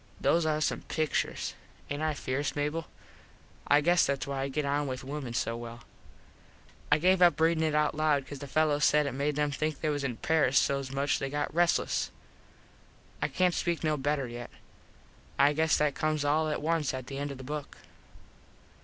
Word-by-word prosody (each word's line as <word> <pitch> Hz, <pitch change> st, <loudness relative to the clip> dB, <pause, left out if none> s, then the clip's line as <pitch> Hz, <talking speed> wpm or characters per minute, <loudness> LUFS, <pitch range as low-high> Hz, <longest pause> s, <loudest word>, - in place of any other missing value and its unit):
Those 165 Hz, -1 st, +2 dB
are 155 Hz, -1 st, +1 dB
some -, -, 0 dB
picturs. 155 Hz, -1 st, -2 dB, 0.4 s
Aint 145 Hz, +1 st, -2 dB
I 155 Hz, -1 st, 0 dB
fierce, 140 Hz, +1 st, -2 dB
Mable? 150 Hz, +2 st, -2 dB, 0.8 s
I 145 Hz, +1 st, +5 dB
guess 175 Hz, +3 st, +4 dB
thats 140 Hz, -1 st, -1 dB
why 140 Hz, -1 st, -3 dB
I 135 Hz, -, -1 dB
get 140 Hz, +2 st, -2 dB
on 145 Hz, +1 st, 0 dB
with 130 Hz, -1 st, -4 dB
wimen 135 Hz, -3 st, -5 dB
so 115 Hz, -, -1 dB
well. 120 Hz, 0 st, -8 dB, 1.1 s
I 150 Hz, -, +6 dB
gave 185 Hz, +3 st, +3 dB
up 175 Hz, -2 st, +5 dB
readin 165 Hz, 0 st, +3 dB
it 155 Hz, -1 st, +1 dB
out 150 Hz, 0 st, +2 dB
loud 150 Hz, -3 st, +1 dB
cause 145 Hz, 0 st, -8 dB
the 140 Hz, -, -7 dB
fellos 150 Hz, 0 st, +2 dB
said 150 Hz, 0 st, +4 dB
it 140 Hz, -, -1 dB
made 140 Hz, +3 st, -1 dB
em 150 Hz, -1 st, +1 dB
think 155 Hz, +1 st, -2 dB
they 155 Hz, -, 0 dB
was 145 Hz, -1 st, -1 dB
in 125 Hz, -4 st, -2 dB
Paris 155 Hz, -5 st, +2 dB
so 140 Hz, 0 st, +2 dB
much 140 Hz, +1 st, 0 dB
they 135 Hz, -, -3 dB
got 145 Hz, +1 st, -2 dB
restles. 170 Hz, +1 st, +1 dB, 1.1 s
I -, -, +2 dB
cant 180 Hz, -1 st, +1 dB
speak 170 Hz, -1 st, -1 dB
no 155 Hz, -1 st, +2 dB
better 145 Hz, -1 st, -1 dB
yet. 120 Hz, 0 st, -7 dB, 0.9 s
I 140 Hz, +1 st, +5 dB
guess 160 Hz, +1 st, +2 dB
that 150 Hz, -1 st, +1 dB
comes 155 Hz, 0 st, -1 dB
all 155 Hz, +2 st, +2 dB
at 150 Hz, -, -3 dB
once 160 Hz, -4 st, 0 dB
at 130 Hz, -1 st, -6 dB
the 135 Hz, +1 st, -6 dB
end 145 Hz, 0 st, -3 dB
of 140 Hz, -, -7 dB
the 130 Hz, -, -9 dB
book. 150 Hz, +2 st, -6 dB
145 Hz, 195 wpm, -29 LUFS, 140-155 Hz, 1.1 s, I